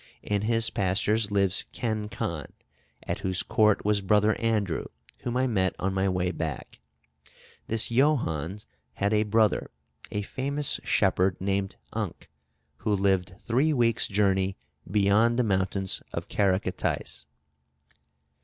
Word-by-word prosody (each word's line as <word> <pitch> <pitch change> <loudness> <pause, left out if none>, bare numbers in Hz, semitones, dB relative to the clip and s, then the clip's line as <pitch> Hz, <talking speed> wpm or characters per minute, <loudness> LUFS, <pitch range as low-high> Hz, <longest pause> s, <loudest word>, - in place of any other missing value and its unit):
In 105 -1 -1
his 115 +1 +1
pastures 105 +3 +2
lives 100 -2 +2
Ken 110 -3 -3
Khan, 105 -10 -4 0.6
at - - -3
whose 95 -1 -1
court 105 -2 +2
was 105 -1 +2
Brother 105 +2 +3
Andrew, 105 -7 0 0.3
whom 125 0 -3
I 130 - +2
met 95 -7 +1
on 95 +1 -1
my 95 0 +1
way 90 -1 0
back. 80 -7 -5 0.9
This 115 0 0
Johannes 105 - +1 0.3
had 100 +1 0
a 105 - +3
brother, 110 0 +2 0.4
a 105 - -3
famous 140 +6 -1
shepherd, 95 -1 +2
named 95 0 -1 0.2
Unc, - - -5 0.5
who 105 - 0
lived 95 -2 +1
three 135 +7 +2
weeks' 115 -4 +2
journey 95 -1 +1 0.3
beyond 105 +4 +3
the 125 - +3
mountains 95 -2 +1
of - - -4
Caracatais." 95 -2 -1
100 Hz, 125 wpm, -27 LUFS, 95-115 Hz, 0.9 s, Brother